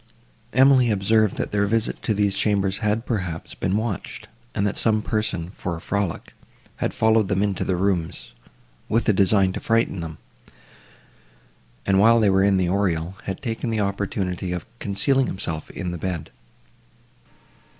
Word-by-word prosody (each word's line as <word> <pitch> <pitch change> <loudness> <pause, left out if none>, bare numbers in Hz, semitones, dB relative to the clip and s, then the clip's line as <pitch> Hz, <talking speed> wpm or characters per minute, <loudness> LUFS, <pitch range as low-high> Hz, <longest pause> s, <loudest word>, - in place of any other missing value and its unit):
Emily 130 -1 +5
observed, 110 +1 +2
that - - -2
their 100 -1 +1
visit 115 +1 0
to 110 - 0
these 100 -1 +2
chambers 100 -1 +1
had, 105 +2 0
perhaps, 90 -8 -3
been 95 +2 -1
watched, 110 -3 -4 0.3
and 100 - +1
that 105 - 0
some 110 -2 +1
person, 100 -7 -2
for 90 -4 -4
a - - -7
frolic, 100 -1 -3 0.4
had - - -1
followed 110 -2 +3
them 95 +1 +1
into 100 -3 -1
the 95 - 0
rooms, 90 -3 -1 0.6
with 115 +2 +1
a 110 - +5
design 95 -1 +3
to - - -4
frighten 115 -4 +1
them, 80 -2 -6 1.7
and, 95 -1 +3
while 115 +3 +6
they 105 -3 +4
were 95 0 +3
in 100 -1 +3
the 90 -1 +1
oriel, 90 -2 0
had 95 -1 -5
taken 115 -1 -3
the 110 -1 -1
opportunity 95 -2 -2
of 90 - -4
concealing 125 +7 +1
himself 80 -4 -4
in 90 -3 -5
the 85 - -5
bed. 90 -2 -4
100 Hz, 160 wpm, -23 LUFS, 95-110 Hz, 1.7 s, while